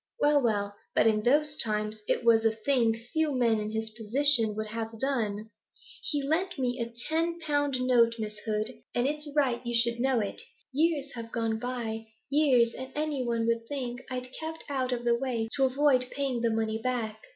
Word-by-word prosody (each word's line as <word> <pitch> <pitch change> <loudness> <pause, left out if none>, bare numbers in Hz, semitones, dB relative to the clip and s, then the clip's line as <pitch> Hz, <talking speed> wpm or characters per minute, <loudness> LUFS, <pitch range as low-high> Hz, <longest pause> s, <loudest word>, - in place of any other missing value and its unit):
'Well, 290 -1 +4
well, 205 -4 0 0.2
but - - +4
in 215 -1 +3
those 295 +6 +2
times 215 -1 -1
it - - +1
was 230 -1 +5
a 225 0 +2
thing 230 -1 +2 0.2
few 315 -2 +1
men 230 -3 +3
in 210 0 -3
his 220 0 -3
position 225 0 +3
would 215 0 -3
have 225 0 -5
done. 220 -5 -1 0.5
He 290 -2 -1
lent 355 +5 0
me 250 -1 -1
a 235 0 -3 0.2
ten 330 +2 0
pound 290 -4 0
note, 240 -2 +4
Miss 215 -1 -5
Hood, 215 +1 -2 0.2
and 245 - +2
it's 295 +1 -2
right 260 -5 +2
you 240 -1 -2
should 235 0 +1
know 260 -1 +2
it. 205 -2 -3 0.3
Years 295 -1 +1
have 230 -1 -7
gone 225 -2 -1
by, 230 -2 -4 0.2
years, 260 -6 +4
and 260 0 -7
any 300 -3 -1
one 235 -1 0
would 230 0 0
think 250 -3 -4
I'd 250 0 -5
kept 320 0 -5
out 260 -2 -1
of 240 -1 -2
the 240 0 +3
way 235 -2 -1
to 270 - +4
avoid 260 -1 +3
paying 270 -4 -2
the 235 - +2
money 220 0 -1
back. 225 -3 -2
240 Hz, 195 wpm, -29 LUFS, 225-275 Hz, 0.5 s, was